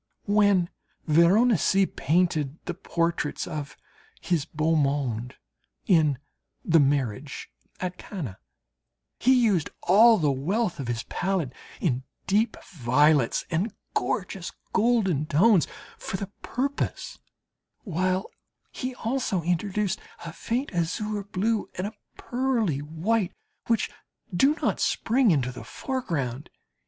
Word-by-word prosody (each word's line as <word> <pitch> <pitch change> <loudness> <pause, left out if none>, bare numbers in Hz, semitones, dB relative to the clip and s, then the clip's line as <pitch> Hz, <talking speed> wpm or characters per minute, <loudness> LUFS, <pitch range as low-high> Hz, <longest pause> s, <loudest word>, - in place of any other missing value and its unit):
When 205 -4 +3 0.3
Veronese 190 +4 +4
painted 155 -1 +1
the 175 - -2
portraits 170 -3 -1
of 150 -4 -6 0.4
his 165 -5 0
beau 155 +2 0
monde 135 -5 0 0.5
in 155 -7 +4 0.5
the 165 -1 +5
"Marriage 140 -1 -1 0.3
at 180 0 -4
Cana," 140 - -6 0.8
he 260 +2 +5
used 210 - +3
all 220 +5 +7
the 150 -6 +2
wealth 180 - -1
of 135 - -4
his 115 -1 -2
palette 175 -8 -2 0.3
in 130 -7 0 0.2
deep 215 +3 +2 0.2
violets 145 -1 +3
and 185 +6 -1 0.2
gorgeous 185 -2 -2 0.2
golden 195 - +2
tones 180 +3 +4 0.3
for 190 - -4
the 195 0 -6
purpose, 275 +3 -3 0.6
while 185 +1 0 0.5
he 255 -1 -4
also 230 -7 -1
introduced 190 +3 0 0.3
a 170 - -6
faint 245 +7 -2
azure 200 +5 -1
blue 205 +2 -1
and 185 - -2
a 210 - -5 0.2
pearly 240 - 0
white 175 +7 -1 0.3
which 230 -2 +1 0.4
do 275 - +4
not - - +1
spring 240 +1 +2
into 135 -7 +2
the 125 - -9
foreground. 150 - -3
180 Hz, 115 wpm, -26 LUFS, 150-210 Hz, 0.8 s, all